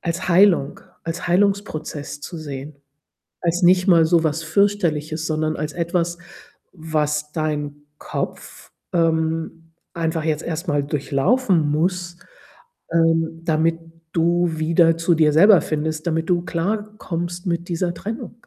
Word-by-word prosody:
als 170 +2 -3
Heilung 175 -5 +4 0.2
als 165 +2 -4
Heilungsprozess 175 -6 -1
zu 170 - -7
sehen. 145 -2 -7 0.7
Als 175 +1 0
nicht 180 +1 +5
mal 170 -3 +6
so 165 0 +3
was 160 +1 0
Fürchterliches, 160 -3 0
sondern 155 0 -1
als 150 0 -4
etwas, 170 0 -1 0.5
was 150 -3 -2
dein 150 -2 -2 0.2
Kopf, - - -6 0.2
ähm, 165 -1 -1 0.2
einfach 165 -1 -2
jetzt 155 -1 -1
erst 165 +2 -4
mal 145 -2 +1
durchlaufen 150 - +1
muss, 175 +2 -1 0.7
ähm, 165 0 +1
damit 165 0 +1 0.3
du 175 +1 +2
wieder 165 +1 +3
zu 170 +1 +2
dir 155 -2 +3
selber 185 +4 +7
findest, 155 +1 -3
damit 165 0 -1
du 175 -1 +2
klarkommst 175 -1 -3
mit 170 0 -2
dieser 175 0 -1
Trennung. 225 +5 -7
165 Hz, 125 wpm, -21 LUFS, 155-175 Hz, 0.7 s, selber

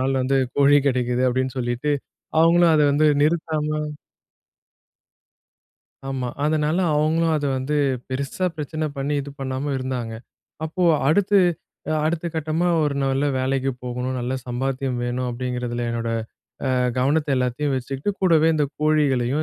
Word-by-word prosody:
நாள் 135 +1 +1
வந்து 135 +1 +2 0.2
கோழி 145 +1 +6
கெடைக்குது. 125 -1 0
அப்படின்னு 130 +1 -1
சொல்லிட்டு, 120 +4 -1 0.5
அவங்களும் 170 0 +5
அத 150 - +4
வந்து 155 +1 +4
நிறுத்தாம 155 -1 0 2.4
ஆமா. 130 -2 -2 0.2
அதனால 155 +2 +1 0.2
அவுங்களும் 160 +2 +2
அதை 145 -1 -1
வந்து 145 +3 -1 0.3
பெருசா 140 +7 -2
பிரச்சனை 155 +1 -3
பண்ணி 140 +2 -1
இது 140 - -7
பண்ணாம 135 +2 -3
இருந்தாங்க. 125 -3 -4 0.5
அப்போ 170 +4 -3 0.3
அடுத்து, 200 +4 +4 0.5
அ - - +2
அடுத்த 170 +1 -1
கட்டமா 160 +3 0 0.2
ஒரு 145 -1 0
நல்ல 135 +1 +1
வேலைக்கு 135 +1 0
போகணும், 125 +1 -3
நல்ல 125 +2 -2
சம்பாத்தியம் 130 +1 -2
வேணும், 125 +1 -2
அப்படிங்கிறதுல 120 -1 -3
என்னோட 115 0 -2 0.6
அ - - +1 0.3
கவனத்தை 145 +4 +1
எல்லாத்தையும் 125 +3 0
வச்சுக்கிட்டு, 135 +7 -3
கூடவே 165 -4 +4
இந்த 150 -2 +2 0.2
கோழிகளையும் 145 -3 +2
135 Hz, 130 wpm, -23 LUFS, 130-155 Hz, 2.4 s, கோழி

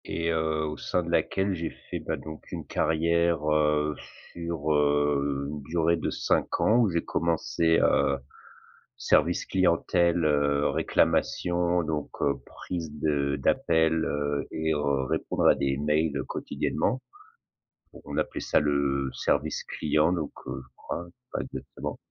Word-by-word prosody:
Et 85 +1 -1
heu, 80 -1 0
au 75 -1 -4
sein 90 - -1
de 85 - -5
laquelle 95 +4 +1
j'ai 85 -2 -3
fait, - - -7
bah, - - -3
donc 80 0 -10
une - - -5
carrière, 85 -1 +1
heu, 75 0 +2 0.4
sur, 85 -3 -3
heu, 70 -1 +1
une 75 -1 -6
durée 85 +2 +1
de 80 - -2
5 - - 0
ans 110 - +4
où 115 -4 +4
j'ai 85 -1 0
commencé, 85 0 +1
heu, 70 - +3 0.8
service 85 +1 +2
clientèle, 85 -2 +2
heu, 70 -1 +2
réclamation 90 0 +1
donc 75 -3 -3
heu, 70 - +2
prise 85 -4 -6
de 70 -2 +1
d'appel, 80 +3 +2
heu 75 0 -1
et 80 0 0
heu, 70 -2 0
répondre - - 0
à - - +7
des 70 0 0
mails 75 +1 +1
quotidiennement. 130 +1 -1 1.0
On - - -6
appelait - - -2
ça - - +2
le 70 -2 +1
service - - 0
client, 75 +2 +1
donc 80 -5 -2 0.2
heu, 65 +1 -4
je 65 - -17
crois, 85 - -5 0.3
pas - - -2
exactement. - - -6
80 Hz, 145 wpm, -27 LUFS, 75-85 Hz, 1.0 s, à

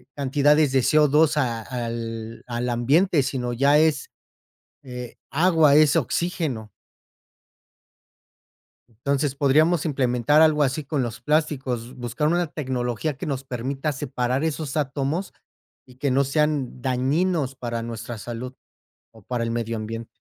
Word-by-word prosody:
cantidades 145 +1 +3
de 135 -1 +3
CO2 150 +2 +4
a, 120 -5 0
al 115 -2 -5
al 120 +1 -2
ambiente, 145 +8 +3
sino 125 -3 -2
ya 140 +4 +4
es, 160 - +2 0.7
eh, 125 -2 -8 0.2
agua, 160 -2 +4
es 155 +1 +5
oxígeno. 155 -7 -1 2.2
Entonces 135 +4 -1
podríamos 155 +4 +3
implementar 135 +1 +2
algo 155 -2 +4
así 140 +2 0
con 140 0 -1
los 120 -2 -5
plásticos, 135 -6 -1
buscar 120 +4 -2
una 175 0 +1
tecnología 130 0 -3
que - - -6
nos 140 -3 -3
permita 135 +4 -3
separar 130 0 -2
esos 155 -3 -3
átomos 145 +5 -2 0.5
y 125 - -17
que 140 +1 -1
no 135 +2 +3
sean 145 -3 -1
dañinos 135 +3 0
para 120 -2 -4
nuestra 115 0 -6
salud 120 +4 -6 0.6
o 110 -2 -17
para 120 0 -2
el 115 - -2
medio 115 -1 -2
ambiente. 115 +1 -5
135 Hz, 130 wpm, -24 LUFS, 120-150 Hz, 2.2 s, es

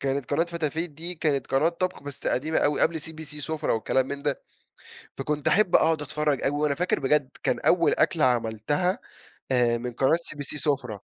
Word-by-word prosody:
كانت 135 -1 -2
قناة 145 +4 +2
فتافيت، 165 0 -3
دي 165 +4 -3
كانت 150 -5 0
قناة 135 +4 +2
طبخ 180 0 -3
بس 145 -1 -8
قديمة 155 +5 +1
أو 145 0 +2
قبل 160 0 +2
CBC 160 0 -9 0.2
سفرة، 155 +2 -2
والكلام 130 +3 +1
من 140 0 -5
ده. 145 -2 -1 0.8
فكنت 145 +1 -1
أحب 205 -3 +4
أقعد 160 -2 +2
أتفرج 150 -1 -1
أوي. 135 - +2
وأنا 150 -2 +2
فاكر 180 +5 0
بجد 135 0 +2
كان - - 0
أول - - +4
أكلة - - +2
عملتها 125 - +1 0.5
آآ، 120 -2 +3
من 125 +1 -5
قناة 130 +6 +3
CBC 150 -4 -7
سفرة 135 -9 -1
145 Hz, 180 wpm, -26 LUFS, 135-160 Hz, 0.8 s, أحب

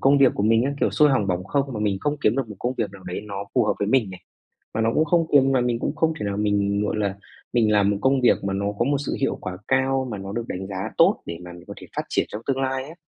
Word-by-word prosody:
công 140 +1 +4
việc 135 -2 +5
của 100 - -1
mình 115 +3 +3
á, 140 - 0
kiểu, - - +2
xôi 150 -1 +4
hỏng 120 -7 +1
bỏng 90 -1 -1
không 140 +6 -1
mà 105 - -3
mình 100 -2 +1
không 150 0 -1
kiếm - - +2
được 130 -5 -1
một 105 - -9
công 125 +2 -2
việc 105 -4 -1
nào 95 -1 -12
đấy 90 - -4
nó 100 -1 -5
phù - - +4
hợp - - +2
với 100 - -1
mình 115 -5 +2
nè. 95 - -9 0.6
Mà 110 - 0
nó 110 0 +2
cũng 155 - +3
không 170 -1 +2
kiếm 135 -2 +5
mà 130 - +3
mình 120 -1 0
cũng - - -2
không 160 0 +2
thể 105 - -2
nào 100 0 -2
mình, 100 -1 +1
gọi 105 - -1
là, 100 -2 -1 0.4
mình 110 -3 +3
làm 105 -1 +4
một 100 - 0
công 135 +2 +3
việc 120 -4 +3
mà 100 - -1
nó 100 +1 -1
có 120 - +2
một 140 +1 +1
sự - - -2
hiệu - - 0
quả 90 0 -5
cao 130 0 +1
mà 105 - -4
nó 95 0 -6
được 115 +2 -4
đánh 95 +1 -4
giá 95 -1 -4
tốt - - +4
để 85 - -5
mà 90 - -9
mình 85 0 -12
có - - -8
thể - - -11
phát - - 0
triển - - +1
trong 105 +2 -6
tương 135 -1 0
lai 130 0 -1
á. 155 - -10
110 Hz, 320 wpm, -23 LUFS, 100-135 Hz, 0.6 s, việc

